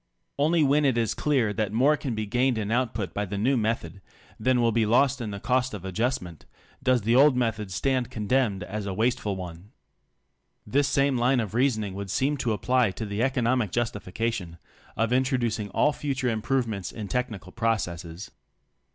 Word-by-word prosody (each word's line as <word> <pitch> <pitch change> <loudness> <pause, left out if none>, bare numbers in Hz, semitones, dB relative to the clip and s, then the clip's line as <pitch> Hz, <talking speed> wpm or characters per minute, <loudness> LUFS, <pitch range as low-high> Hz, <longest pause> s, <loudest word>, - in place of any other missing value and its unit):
Only 160 +2 +3
zvlicn 145 +2 +3
it 130 -4 +2
is 115 -2 +1
clear 125 -8 +1
that 105 -1 -1
more 130 +7 +4
can 135 -5 -4
be 110 0 -2
gained 125 +3 +1
in 105 -1 -2
output 115 -6 -1
by 105 - -1
the 100 +1 -5
nezv 125 +6 +2
method, 105 -5 -2 0.4
than 130 -1 +2
will 115 -1 +3
be 115 -1 +1
lost 130 +3 +3
in 110 - -3
the 100 -1 -5
cost 125 +1 0
of 95 -2 -8
adjustment, 95 -4 -3 0.3
does 130 -4 +2
the 115 +3 +2
old 140 0 +6
method 110 -5 -1
stand 125 +5 0
condemned 110 -3 0
as 105 0 -5
a 95 - -3
wasteful 110 -2 0
one. 90 +3 -9 0.9
This 140 +6 +2
same 135 -1 +2
line 125 +2 +3
of 110 -3 -3
reason 120 -2 +2
ing 100 -2 -5
would 100 0 -6
seem 135 +9 +1
to 120 -4 0
apply 125 +1 +2
to 105 +4 -5
the 100 +1 -3
economic 125 -4 +1
justification 105 -5 -3 0.4
of 115 +2 +1
introducing 120 -5 0
all 150 +8 +2
future 135 -4 -2
improvements 110 -3 -1
in 105 -3 -6
technical 120 -6 -3
processes. 95 -6 -2
115 Hz, 180 wpm, -26 LUFS, 105-130 Hz, 0.9 s, old